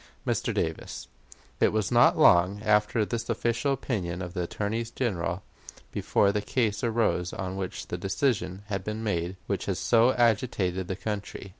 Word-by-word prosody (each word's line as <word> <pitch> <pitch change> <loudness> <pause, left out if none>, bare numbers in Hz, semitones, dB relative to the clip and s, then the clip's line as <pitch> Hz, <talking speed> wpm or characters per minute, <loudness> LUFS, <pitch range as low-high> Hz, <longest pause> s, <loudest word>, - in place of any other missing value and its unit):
'" - - -34
Mr. - - 0
Davis: - - -3 0.5
It - - +4
was 105 -4 0
not - - +5
long 90 +4 +5
after 105 +1 +3
this 115 +2 -4
official 120 +3 0
opinion 95 -9 -2
of 90 -1 -7
the 90 - -2
Attorney 105 +6 -2
General 95 -7 -2 0.5
before 100 - +2
the 105 +1 -1
case 110 -1 0
arose 110 -6 +1
on 95 0 -4
which 95 -2 -4
the 90 - -3
decision 95 0 -1
was 105 +1 -3
made 95 -5 -2
which - - -2
has - - 0
so 120 +2 +4
agitated 105 -6 +1
the 95 - -2
country. 100 -1 -5
105 Hz, 160 wpm, -27 LUFS, 95-115 Hz, 0.5 s, not